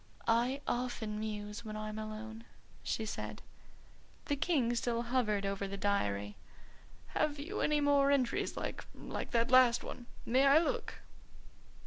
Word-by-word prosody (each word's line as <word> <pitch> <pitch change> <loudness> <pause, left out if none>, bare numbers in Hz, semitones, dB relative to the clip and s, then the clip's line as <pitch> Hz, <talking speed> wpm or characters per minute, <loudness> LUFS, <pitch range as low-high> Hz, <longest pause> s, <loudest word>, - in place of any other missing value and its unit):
"I 240 +4 +2
often 240 -4 -2
muse 210 0 -4
when 215 -1 -5
I'm 215 0 -4
alone," 220 +1 -7 0.4
she 220 - -2
said. 215 - -5 0.8
The 290 - 0
King 275 -6 +1
still 235 0 0
hovered 230 -5 +1
over 195 0 -2
the 200 +1 -5
diary. 105 - 0 0.7
"Have 295 -1 0
you 335 +9 -4
any 300 -1 +2
more 285 -1 +4
entries 270 -4 +1
like - - -4
like - - -5
that 235 0 +1
last 250 -2 +6
one? 240 -1 -8 0.2
May 260 +4 +4
I 275 +2 +7
look?" 465 +9 0
235 Hz, 140 wpm, -34 LUFS, 215-275 Hz, 0.8 s, I